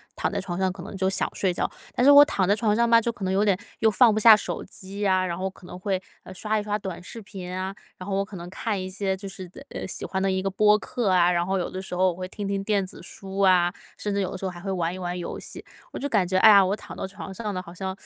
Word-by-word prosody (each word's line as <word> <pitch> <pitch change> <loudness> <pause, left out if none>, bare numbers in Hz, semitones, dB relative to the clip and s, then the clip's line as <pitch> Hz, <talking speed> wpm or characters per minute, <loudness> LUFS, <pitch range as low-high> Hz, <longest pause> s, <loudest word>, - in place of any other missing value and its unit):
躺 - - -1
在 - - -2
床 175 -1 -4
上， 190 -1 +1
可 180 -1 -9
能 - - -8
就 190 0 +1
想 190 - 0
睡 190 - 0
觉。 175 - -1 0.3
但 245 - +2
是 285 - +9
我 285 0 +10
躺 195 -10 0
在 200 - +4
床 215 -1 +1
上 235 +1 +3
吧， 230 0 +6
就 235 - -1
可 210 - -10
能 185 - 0
有 195 +2 +3
点， 200 -3 +3 0.2
又 220 - +4
放 230 +1 +5
不 215 - 0
下 220 0 +9
手 - - -4
机 200 +2 -5
啊， 185 -1 +2
然 170 -2 -2
后 190 +2 -2
可 190 - -17
能 180 - -9
会， 190 0 -1 0.2
呃， - - -11
刷 215 +3 -1
一 - - -4
刷 210 0 -1
短 190 -4 -6
视 205 +6 -9
频 195 -4 -8
啊， 185 +1 -3 0.2
然 185 - -9
后 195 - -1
我 195 - +1
可 200 -1 -9
能 170 0 -8
看 205 +1 -2
一 185 - -4
些 190 0 -1
就 200 +1 -7
是 190 -1 -8
的 - - -12 0.2
喜 - - -6
欢 190 - -2
的 195 - +1
一 190 0 0
个 195 - -1
播 210 +2 +4
客 230 -1 -2
啊， 180 -1 +4
然 175 -1 +1
后 190 +1 0
有 180 - -2
的 185 - -6
时 190 -1 -6
候 185 +1 +3
我 - - -9
会 185 +1 -5
听 205 +2 -6
听 195 0 -1
电 200 -2 +1
子 - - -11
书 195 0 -8
啊， 180 -2 +4 0.2
甚 205 - -3
至 200 - 0
有 185 - -1
的 - - -5
时 185 - -10
候 190 - -1
还 175 - -10
会 195 +3 -6
玩 175 -2 -1
一 - - -6
玩 180 0 -3
游 175 - -5
戏。 - - -9 0.3
我 - - -5
就 285 - -3
感 205 -7 +2
觉， 185 +1 +1
哎 220 - +8
呀， 200 -2 +8
我 195 +2 0
躺 - - -11
到 - - -4
床 190 0 -8
上 210 +1 -4
了， 185 - -3
好 170 -1 -12
像， 190 +1 -4
190 Hz, 340 characters per minute, -25 LUFS, 185-205 Hz, 0.3 s, 我